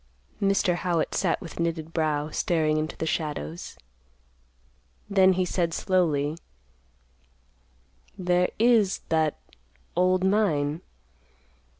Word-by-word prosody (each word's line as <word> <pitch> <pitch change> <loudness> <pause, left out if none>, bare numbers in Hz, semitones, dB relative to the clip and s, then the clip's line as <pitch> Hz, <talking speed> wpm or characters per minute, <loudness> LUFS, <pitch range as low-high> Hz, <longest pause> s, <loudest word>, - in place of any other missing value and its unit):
Mr. 195 -2 +2
Howitt 175 -2 -1
sat - - +1
with 165 - -9
knitted 165 -1 -2
brow, 155 -2 0
staring 155 -3 +1
into 155 +1 -3
the - - -2
shadows. 145 - -4 1.3
Then 190 -2 +5
he 185 0 0
said 170 -2 -1
slowly, 160 -4 0 1.8
"There 180 -1 +2
is 225 -4 +3
that 160 -2 +1 0.6
old 185 +1 +2
mine. 170 -7 +1
170 Hz, 95 wpm, -26 LUFS, 155-185 Hz, 1.8 s, Then